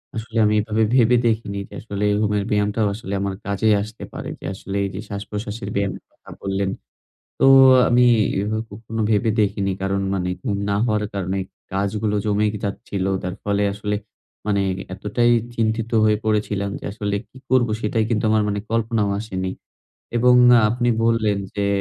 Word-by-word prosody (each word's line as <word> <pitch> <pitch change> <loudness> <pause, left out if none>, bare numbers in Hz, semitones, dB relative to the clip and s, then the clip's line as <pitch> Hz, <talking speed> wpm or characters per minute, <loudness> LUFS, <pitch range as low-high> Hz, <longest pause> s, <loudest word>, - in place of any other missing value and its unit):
আসলে 115 +1 -5
আমি 105 - +3
এভাবে 110 +1 0
ভেবে 125 -1 +5
দেখিনি। 110 -3 -1
যে - - -15
আসলে 100 -2 -4 0.2
ঘুমের 105 -1 +1
ব্যায়ামটাও 105 +1 +1
আসলে 100 -2 -6
আমার 100 0 -1
কাজেই 100 +2 +2
আসতে 110 +2 -8
পারে। - - -6
যে - - -10
আসলে 95 +1 -7
এইযে 95 0 -5
শ্বাসপ্রশ্বাসের 105 +1 -5
ব্যায়ামের 100 -2 -2
কথা - - -19
বললেন। 95 0 -1 0.7
তো - - +4 0.4
আমি 125 0 +4 0.4
এভাবে 110 +2 -2
কখনো 110 +2 -6
ভেবে 110 +1 +2
দেখিনি। 100 -1 0
কারণ 100 0 0
মানে 90 -2 -1 0.2
ঘুম 100 - 0
না 100 - +1
হওয়ার 105 -3 0
কারণে 95 0 -2 0.3
কাজগুলো 105 +2 -1
জমে 105 0 +2
এ - - 0
যাচ্ছিল। 100 -1 -3 0.2
যার 90 0 -3
ফলে 100 0 +1
আসলে 105 0 -2 0.5
মানে 100 -2 +1 0.3
এতটাই 105 +5 +1 0.2
চিন্তিত 115 0 -1
হয়ে 105 0 +4
পড়েছিলাম 105 -2 0
যে - - -13
আসলে 105 -2 -3
কি - - -22
করবো? 125 -3 +3
সেটাই 110 0 0
কিন্তু 110 -1 0
আমার 110 -1 +3
মানে 100 0 -1
কল্পনাও 115 -2 0
আসেনি। 95 -4 -3 0.7
এবং 125 +1 +5 0.2
আ - - +5
আপনি 120 +1 0 0.2
বললেন 110 -3 +2 0.2
যে 100 - 0
105 Hz, 165 wpm, -21 LUFS, 100-110 Hz, 0.7 s, ভেবে